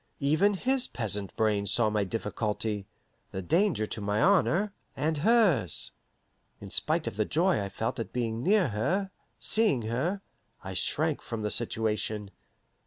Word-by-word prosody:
Even 160 +9 +3
his 255 +5 +1
peasant 105 -4 -2
brain 105 -2 +1
saw 105 +2 +5
my 105 -1 +1
difficulty, 105 0 -3 0.4
the 95 - -5
danger 170 - +2
to 105 - -5
my 105 +1 0
honour 195 - +3 0.2
and 155 0 0
hers. 190 - +3 0.7
In 100 -1 -9
spite 155 +1 +1
of - - -5
the 110 - +2
joy 170 - +2
I 100 - -4
felt 110 +4 -3
at 115 - -4
being 115 -2 -2
near 190 0 +3
her, 185 - -1 0.3
seeing 215 - +2
her, 150 - -2 0.4
I 95 0 -6
shrank 155 - 0
from 115 -2 -5
the 105 - -1
situation. 110 -3 -1
115 Hz, 150 wpm, -28 LUFS, 105-175 Hz, 0.7 s, saw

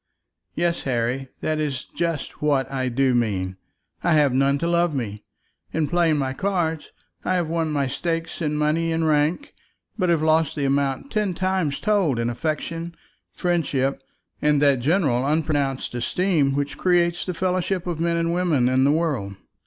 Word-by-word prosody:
"Yes, 170 0 0
Harry; 125 +1 -1
that 155 0 -1
is 140 -4 -2
just 165 -4 -3
what 140 -3 +1
I 130 -2 -1
do 130 +1 +2
mean. 95 -6 0 0.5
I 170 - +3
have 145 -4 +4
none 135 +2 +3
to 170 - -1
love 170 -2 +2
me. 105 -5 -4 0.5
In 160 -2 +1
playing 165 -1 +2
my 135 -2 -1
cards 170 -3 -1 0.3
I 185 - 0
have 175 -3 0
won 165 -1 -1
my 140 -2 +1
stakes 165 +6 -3
in 150 -2 0
money 155 +2 +1
and 160 0 +1
rank, 155 - +1 0.5
but 180 -2 +2
have 165 -2 +2
lost 160 -1 +2
the 145 - -1
amount 140 - 0
ten 210 -5 0
times 185 -6 0
told 200 - +2
in 115 +1 0
affection, 165 +5 -3 0.4
friendship, 145 -7 0 0.4
and 150 -1 +3
that 140 -3 +4
general 140 -3 +2
unpronounced 145 -3 0
esteem 140 +3 +1
which 145 0 -2
creates 175 -1 +2
the 180 - -4
fellowship 185 0 -1
of 175 -3 -3
men 170 0 +1
and 165 0 0
women 170 -8 +2
in 130 +1 +3
the 140 - +4
world. 145 -12 -1
155 Hz, 170 wpm, -23 LUFS, 135-170 Hz, 0.5 s, have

